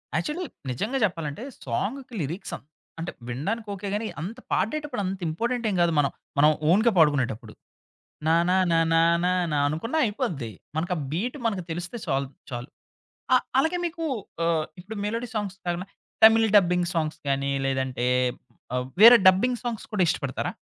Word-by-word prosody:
Actually 340 +4 -2 0.3
నిజంగా 215 - -2
చెప్పాలంటే 165 - -4 0.2
సాంగుకి 235 - -3
lyrics 165 +8 -5
అ - - -17 0.4
అంటే 165 +1 -4 0.2
వినడానికి 200 - -3
ఓకే 200 +1 -6
గానీ, 215 +2 -1
అంత 220 +9 -6
పాడేటప్పుడు 295 +2 -1
అంత 190 0 -3
ఇంపార్టెంటేం 230 +5 -1
కాదు 170 -1 +3
మనం 140 -2 +3 0.3
మనం 150 +2 +6 0.2
ఓన్‌గా 220 +7 +5
పాడుకునేటప్పుడు. 130 -8 +2 0.7
నా 160 - +5
న - - +3 0.2
న - - +3 0.2
నా 165 - +5 0.2
న 180 - +3 0.3
నా - - +1
అనుకున్నా 230 - -2
అయిపోద్ది. 190 - -3 0.2
మనకు 170 +3 -1
ఆ - - -3
బీటు 235 - -2
మనకు 200 -5 -2
తెలిస్తే 175 +7 -5
చాలు 135 -4 -1 0.2
చాలు. 120 +2 -5 0.7
ఆహ్, 255 - +3 0.2
అలాగే 320 +5 +1
మీకు 335 0 -4 0.4
ఆహ్, 160 -2 +1 0.2
ఇప్పుడు 210 +4 -8
మెలోడి 230 +3 -3
సాంగ్స్ 200 -3 -3
కాకుండా 175 +2 -2 0.4
తమిళ్ 225 0 +8
డబ్బింగ్ 180 -2 +2
సాంగ్స్ 155 -2 -1
గానీ, 140 0 0
లేదంటే 130 -2 -1 0.7
ఆహ్, 125 0 -1 0.2
వేరే 235 +1 +11
డబ్బింగ్ 240 +6 +1
సాంగ్స్ 235 -3 -4
కూడా 195 -3 +3
ఇష్టపడతారా? - - -2
185 Hz, 155 wpm, -26 LUFS, 155-230 Hz, 0.7 s, వేరే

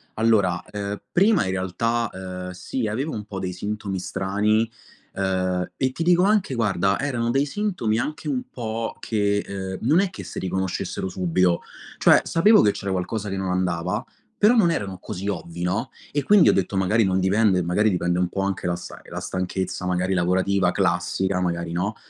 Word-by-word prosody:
Allora, 105 -6 +2
uhm, 100 0 -4
prima 195 - +4
in 95 - -1
realtà, 115 +5 -1
uhm, 90 -1 -6
sì, 110 +6 -3
avevo 135 +9 -2
un 105 -1 -5
po' 100 -2 -6
dei 90 -1 -3
sintomi 100 0 -4
strani, 105 +5 0 0.4
uhm, 95 -1 -1
e 130 -1 +1
ti 165 - -3
dico 175 +1 +4
anche, 200 -8 +2
guarda, 100 -3 +1
erano 120 -5 -1
dei 135 +3 +2
sintomi 160 - -1
anche 150 +4 -3
un 130 -3 -1
po' 115 -1 -4
che 100 -2 0 0.4
uhm, 115 - -2
non 160 +6 +5
è 195 - 0
che - - -9
se - - -6
riconoscessero 95 0 -2
subito. 90 -1 +1 0.4
Cioè - - +6
sapevo 210 +6 +5
che 105 - +4
c'era 100 -1 -4
qualcosa 100 +3 -2
che 95 - -3
non 95 -1 -2
andava, 90 -2 -1 0.4
però 215 +4 +6
non 200 -7 +5
erano 100 - -2
così 100 -1 -6
ovvi, 85 -3 -5
no, 90 +2 -1 0.2
e 145 - 0
quindi 205 +3 +6
ho - - +5
detto 95 0 0
magari 105 +4 +3
non 95 -1 +1
dipende 95 -1 +3
magari 105 +6 +2
dipende 90 -2 0
un 90 -1 +1
po' 95 - -2
anche 95 -2 -2
da 85 - 0
sai 85 0 -9
la - - -5
stanchezza 95 0 -3
magari 90 +1 0
lavorativa 95 +2 +2
classica, 95 +1 0
magari 85 -1 -2
no. 95 +5 -1
100 Hz, 185 wpm, -24 LUFS, 90-115 Hz, 0.4 s, Cioè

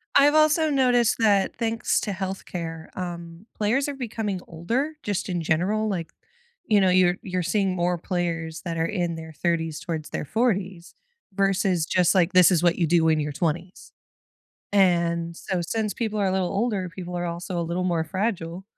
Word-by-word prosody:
I've 290 +2 +6
also 310 0 +4
noticed 250 -4 +3
that- 205 -3 +3
thanks 230 0 0
to 210 - -3
health 190 0 -4
care- 165 -2 -6
um, 170 +1 -6
players 240 +7 +1
are 285 - -3
becoming 220 -7 -4
older, 240 - -2
just 205 -1 -2
in 175 -2 -1
general, 190 +7 +1
like, 175 -5 -3 0.5
you 210 -5 +4
know, 190 - +4
you're 180 -1 +4
you're 185 -2 -2
seeing 195 +1 0
more 175 0 0
players 165 -2 -3
that 165 -2 -4
are 165 - +1
in 175 -4 -1
their 160 0 -8
30s 165 -2 -1
towards 160 -3 -5
their - - -4
40s, 190 - -1 0.4
versus 195 -3 +1
just, 180 0 +3
like, 180 0 +3
"This 185 0 +7
is 170 - +3
what 175 0 +3
you 170 -3 +1
do 165 -1 +3
in 155 -1 +3
your 150 0 -2
20s." 170 +4 -3 0.8
And 170 -3 +2
so 185 0 -3
since 210 +2 -2
people 215 -3 -2
are 195 - +2
a 185 - +1
little 185 -2 0
older, 200 -4 -1
people 180 0 -7
are 175 - -2
also 170 +1 -4
a - - 0
little 175 +2 -2
more 170 -3 0
fragile, 185 -1 -3
180 Hz, 185 wpm, -25 LUFS, 170-205 Hz, 0.8 s, This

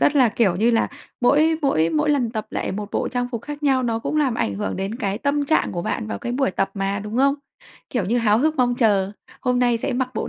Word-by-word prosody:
rất 290 - +3
là 255 -4 +6
kiểu 210 -5 +1
như 225 +5 +3
là 230 - +2 0.3
mỗi 305 +6 +4
mỗi 165 - +2
mỗi 300 -1 +1
lần 250 -6 +1
tập 215 -2 -4
lại - - -3
một 205 +1 -5
bộ - - -1
trang 245 0 -2
phục 235 -2 -4
khác 295 +1 -7
nhau 270 -3 +3
nó 230 -2 0
cũng 265 - -3
làm 275 -6 +2
ảnh 100 - -1
hưởng 95 -1 -3
đến 195 +3 -3
cái 200 -4 -2
tâm 285 +2 0
trạng 315 +3 +1
của 175 - -3
bạn 105 - -2
vào 105 -2 -4
cái 240 - -4
buổi 265 -3 +1
tập 195 +1 -1
mà, 195 0 -1
đúng 210 +3 -5
không? 275 +2 +4 0.6
Kiểu 240 -6 -1
như 230 +6 +1
háo 220 -2 +3
hức 310 +4 +2
mong 245 -1 +2
chờ, 205 -5 +2 0.3
hôm 250 -1 +1
nay 245 -2 +2
sẽ 275 +3 -2
mặc 255 +1 0
bộ - - -2
240 Hz, 270 wpm, -22 LUFS, 205-270 Hz, 0.6 s, là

